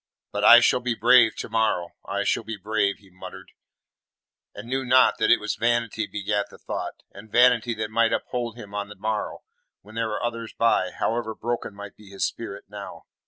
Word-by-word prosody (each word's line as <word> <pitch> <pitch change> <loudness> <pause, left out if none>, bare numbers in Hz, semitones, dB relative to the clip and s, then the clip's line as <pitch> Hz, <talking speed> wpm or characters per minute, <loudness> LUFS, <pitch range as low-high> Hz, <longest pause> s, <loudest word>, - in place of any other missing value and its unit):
"But 105 0 -3
I 120 +2 +9
shall 125 - +3
be 125 -2 -2
brave 120 +1 +5
to - - -5
morrow. 110 -6 0
I 100 +1 -2
shall - - +1
be 110 0 -6
brave," 100 0 0
he 100 -3 -22
muttered, 95 - -11 1.0
and 100 +3 -9
knew 130 +2 -1
not 130 0 +4
that - - +2
it - - +6
was - - -2
vanity 115 -2 0
begat 105 0 -2
the - - -14
thought, - - -6
and 105 +2 -13
vanity 120 -1 +4
that 110 0 -4
might 115 0 +2
uphold 120 -2 -3
him 105 -4 -11
on 100 0 -4
the 105 - -10
morrow 105 +2 -3 0.4
when 105 - -15
there 115 0 -1
were 110 +1 -4
others 115 -1 -4
by, 115 -5 +2
however 110 +2 -2
broken 120 -3 -4
might 100 0 -10
be 105 -2 -16
his 100 0 -2
spirit 100 -3 -6
now. 100 0 -9
110 Hz, 200 wpm, -24 LUFS, 100-120 Hz, 1.0 s, I